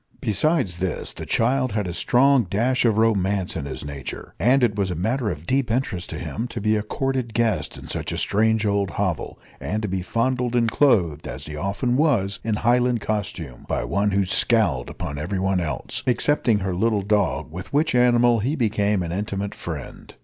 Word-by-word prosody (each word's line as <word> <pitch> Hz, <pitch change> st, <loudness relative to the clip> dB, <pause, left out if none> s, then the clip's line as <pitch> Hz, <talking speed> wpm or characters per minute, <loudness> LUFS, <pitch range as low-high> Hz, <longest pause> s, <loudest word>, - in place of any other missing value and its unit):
Besides 105 Hz, -, 0 dB
this, 95 Hz, -1 st, -3 dB
the -, -, -8 dB
child 130 Hz, 0 st, +1 dB
had 105 Hz, -2 st, -1 dB
a 85 Hz, -, -4 dB
strong 130 Hz, +5 st, +4 dB
dash 120 Hz, +8 st, +1 dB
of 110 Hz, -3 st, +3 dB
romance 100 Hz, -4 st, +1 dB
in -, -, -3 dB
his 70 Hz, -, -5 dB
nature, 70 Hz, -2 st, -7 dB
and 125 Hz, +4 st, +4 dB
it 110 Hz, -4 st, +2 dB
was 100 Hz, -2 st, 0 dB
a 90 Hz, -, -2 dB
matter 110 Hz, -, -1 dB
of 75 Hz, -3 st, -6 dB
deep 130 Hz, +3 st, 0 dB
interest 110 Hz, -7 st, -2 dB
to -, -, -5 dB
him 115 Hz, +3 st, -4 dB
to 120 Hz, -, -6 dB
be 110 Hz, +1 st, +2 dB
a 105 Hz, -, 0 dB
courted 130 Hz, 0 st, -2 dB
guest 115 Hz, -2 st, 0 dB
in -, -, -10 dB
such -, -, -3 dB
a -, -, -3 dB
strange 110 Hz, +1 st, +2 dB
old 100 Hz, -2 st, +1 dB
hovel, 95 Hz, -6 st, -2 dB, 0.2 s
and 110 Hz, +1 st, -3 dB
to -, -, 0 dB
be 95 Hz, -1 st, -2 dB
fondled 125 Hz, +5 st, 0 dB
and 115 Hz, -2 st, +2 dB
clothed, 90 Hz, -, +2 dB
as -, -, -6 dB
he 75 Hz, -, -7 dB
often 100 Hz, -, -1 dB
was, 115 Hz, -11 st, +1 dB
in 110 Hz, -1 st, 0 dB
Highland 120 Hz, +2 st, +2 dB
costume, 95 Hz, -, -4 dB
by -, -, 0 dB
one 100 Hz, +1 st, 0 dB
who 100 Hz, 0 st, +1 dB
scowled 100 Hz, -, +2 dB
upon 70 Hz, 0 st, -5 dB
everyone 95 Hz, +3 st, 0 dB
else 75 Hz, -7 st, -3 dB
excepting 125 Hz, -2 st, +2 dB
her 95 Hz, -1 st, -1 dB
little 105 Hz, +2 st, +1 dB
dog, 100 Hz, -6 st, 0 dB
with 90 Hz, +3 st, -8 dB
which 150 Hz, +2 st, +2 dB
animal 120 Hz, -1 st, +4 dB
he 130 Hz, +9 st, 0 dB
became 105 Hz, -, +1 dB
an 85 Hz, -, -4 dB
intimate 100 Hz, +1 st, -3 dB
friend. 75 Hz, -7 st, -8 dB
105 Hz, 195 wpm, -23 LUFS, 95-120 Hz, 0.2 s, strong